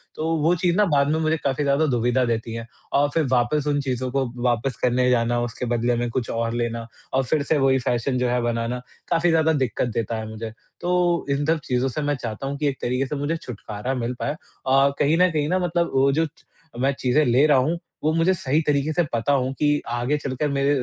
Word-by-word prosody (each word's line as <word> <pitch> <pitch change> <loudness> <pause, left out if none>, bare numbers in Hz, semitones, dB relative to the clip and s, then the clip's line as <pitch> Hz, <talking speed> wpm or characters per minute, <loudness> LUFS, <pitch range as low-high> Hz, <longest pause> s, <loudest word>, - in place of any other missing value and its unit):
तो 155 - -3 0.2
वो 165 +4 +4
चीज़ 175 0 +1
ना 210 - +5
बाद 145 -5 +2
में 160 - +1
मुझे 160 0 +1
काफ़ी 140 +1 0
ज़्यादा 140 +2 +2
दुविधा 125 -1 +1
देती 115 -1 -2
है 115 0 -5 0.3
और 145 +1 +3
फिर 165 - +2
वापस 135 +4 +1
उन 145 -1 +1
चीज़ों 130 -1 -2
को 135 0 +1 0.2
वापस 120 +1 0
करने 125 0 +2
जाना, 120 -1 +2
उसके 120 +1 -4
बदले 120 0 +1
में 120 0 -1
कुछ 120 0 -3
और 115 0 -1
लेना 115 -1 -2 0.3
और 135 0 +2
फिर 140 +3 0
से 155 +1 +1
वही 135 -1 +3
फैशन 125 +2 0
जो 125 -1 +1
है 125 0 +1
बनाना, 120 +1 -2 0.3
काफ़ी 170 0 +2
ज़्यादा 160 0 +3
दिक्कत 130 -4 0
देता 115 0 -2
है 110 0 -5
मुझे। 110 0 -6 0.3
तो, 175 -1 +1
इन 140 +1 0
सब 160 0 +2
चीज़ों 125 +1 +1
से 150 - -3
मैं 145 0 0
चाहता 115 +1 -5
हूँ 140 +1 -3
कि 150 0 0
एक 135 - -1
तरीके 125 +2 0
से 145 - -4
मुझे 145 +4 -1
छुटकारा 115 -1 -5
मिल 120 0 -2
पाए 145 - -1 0.3
और 135 +1 +4
कहीं 150 +3 +3
न 180 0 +5
कहीं 150 -2 0
ना 185 +1 +2
मतलब 175 -1 0
वो 135 +1 +4
जो 160 +3 +2
च 155 - -13 0.4
मैं 135 +2 +2
चीज़ें 130 +4 +3
ले 125 +5 +4
रहा 145 -3 +5
हूँ, 155 +7 +1 0.3
वो 155 - +3
मुझे 165 +3 +3
सही 150 -1 0
तरीके 145 +1 +1
से 175 - +2
पता 120 +5 +1
हों 130 -1 +1
कि, 145 +1 +1
आगे 120 +5 0
चल 135 -2 -4
कर 150 -1 +1
मेरे 140 0 +1
135 Hz, 240 wpm, -23 LUFS, 120-150 Hz, 0.4 s, ना